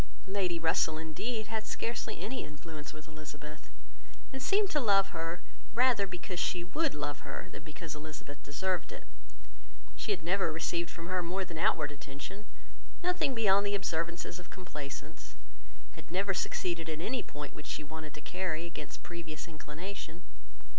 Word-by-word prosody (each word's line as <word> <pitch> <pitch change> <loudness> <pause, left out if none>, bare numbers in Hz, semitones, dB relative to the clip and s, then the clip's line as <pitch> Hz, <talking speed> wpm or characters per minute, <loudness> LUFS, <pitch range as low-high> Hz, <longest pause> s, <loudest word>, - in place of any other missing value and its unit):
Lady 190 -3 +2
Russell, 160 -1 +4
indeed, 215 +9 -1
had 220 0 -1
scarcely 235 - -1
any 255 +4 -1
influence 150 0 -6
with 155 +1 -10
Elizabeth, 150 -1 -8 0.6
and 265 - -2
seemed 400 +3 +5
to 300 - +4
love 195 -6 +6
her, 165 +1 -2 0.3
rather 240 -5 +6
because 180 0 -3
she 175 -1 +2
would 300 - +2
love 145 -1 -1
her, 185 - -5
than - - -6
because 155 +1 -5
Elizabeth 150 -2 -6
deserved 175 +1 0
it. - - -6 0.9
She - - -3
had 150 - +2
never 180 0 +4
received 165 +1 +1
from 165 - -6
her 185 +1 +2
more 185 +3 0
than 165 -3 -5
outward 145 -2 +4
attention, 145 +8 -7 0.6
nothing 355 -7 +3
beyond 200 -3 +7
the 200 0 +3
observances 170 -1 0
of 180 - -10
complaisance; 150 -6 -6 0.6
had - - -11
never 195 +3 +3
succeeded 170 -3 +1
in 155 -1 -1
any 240 +8 +1
point 145 0 -6
which 150 - -8
she - - -1
wanted 155 0 -6
to 150 - -7
carry, 175 -2 0
against 170 - -6
previous 165 -3 -5
inclination. 165 +3 -5
170 Hz, 160 wpm, -34 LUFS, 155-195 Hz, 0.9 s, beyond